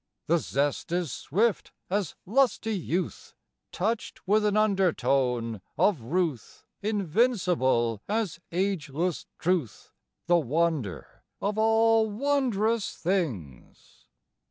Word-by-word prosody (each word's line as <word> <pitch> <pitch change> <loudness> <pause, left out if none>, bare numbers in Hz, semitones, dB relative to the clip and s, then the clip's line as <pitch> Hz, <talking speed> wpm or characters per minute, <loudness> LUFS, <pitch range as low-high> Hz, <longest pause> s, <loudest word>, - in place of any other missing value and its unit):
The 170 +2 +3
zest 145 +2 -1
is 175 -5 -1
swift 210 - 0
as 195 -3 -1
lusty 225 -1 +2
youth, 180 -1 -3 0.4
(Touched 215 +1 -3
with 210 +2 +3
an 210 0 +2
undertone 135 - +1 0.2
of 190 - +3
ruth,) 150 - -2 0.2
Invincible 180 - +1
as 210 -5 -1
ageless 175 -3 -1
truth, 170 - -2 0.3
The 175 0 +4
wonder 155 - -2 0.2
of 210 +2 -1
all 225 0 +4
wondrous 230 -4 0
things! 125 - -4
180 Hz, 95 wpm, -27 LUFS, 145-215 Hz, 0.4 s, The